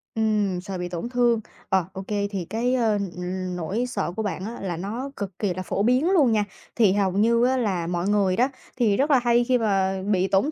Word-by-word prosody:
Ừm, 210 -4 +1
sợ 195 -1 -5
bị 180 0 -4
tổn 175 +7 -4
thương. 240 -2 +2 0.3
Ờ, 190 -3 +2
ô 190 - -5
kê, 205 -1 -1
thì 185 -4 -3
cái, 240 +4 0
ơ, 230 -4 +2 0.2
ừm, 180 0 -4
nỗi 190 +8 -2
sợ 245 - -2
của 220 - -2
bạn 190 -1 -3
á 230 +2 -6
là 175 -4 -3
nó 230 +9 -4
cực 195 -2 -6
kỳ 200 -4 0
là 185 +1 -5
phổ 200 - -1
biến 255 - +3
luôn 295 -11 +4
nha. 210 -2 +2 0.3
Thì 215 -5 +4
hầu 200 -2 +1
như 230 +5 +3
á 260 +1 +2
là 185 -8 -1
mọi 175 +2 -1
người 195 -3 +2
đó 250 +4 +2 0.3
thì 215 -5 +2
rất 290 +3 +2
là 270 - +6
hay 240 0 +3
khi 250 +1 +2
mà 195 -4 +1
bị 190 -1 +2
tổn 200 +12 +2
205 Hz, 240 wpm, -24 LUFS, 185-240 Hz, 0.3 s, là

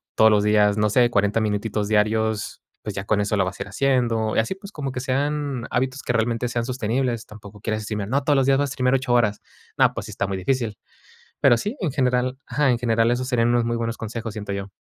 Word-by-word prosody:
todos 110 - +6
los 105 -1 +3
días, 105 -1 +3
no 105 0 +2
sé, 120 +2 +4
40 105 -1 +1
minutitos 105 0 -1
diarios, 110 0 0 0.2
pues 105 - -6
ya 95 - -3
con 105 0 +1
eso 105 +1 0
lo 100 - +2
vas 95 +1 -5
a - - -2
ir - - -14
haciendo. 115 -1 +1
Y - - +3
así, 115 +12 -1
pues, 200 +1 -11
como 140 -6 -4
que 125 - -3
sean 140 -1 -1
hábitos 130 +2 -1
que 125 - -2
realmente 115 +1 0
sean 120 -1 -2
sostenibles. 125 -1 -1
Tampoco 105 -1 -13
quieras 110 +1 -2
decirme: 105 -1 -4
"No, 135 +4 0
todos 145 +1 +3
los 135 - +3
días 135 0 +4
vas 145 0 0
a - - -5
escribir 125 -1 +1
ocho 130 -1 0
horas". 110 -4 +2 0.4
No, - - +4
pues, - - -5
sí - - -8
está - - -2
muy 95 0 -3
difícil. 110 +2 -1 0.6
Pero 120 - +6
sí, 210 - -3
en 175 - 0
general 125 -1 0
Ajá, 145 -2 +1
en 120 - +1
general, 115 -1 +2
esos 125 +1 -1
serían 120 -2 +2
unos 120 0 +2
muy 120 0 -1
buenos 115 0 -2
consejos, 115 0 -5
siento 105 -2 -5
yo. 100 0 -5
115 Hz, 245 wpm, -23 LUFS, 105-130 Hz, 0.6 s, todos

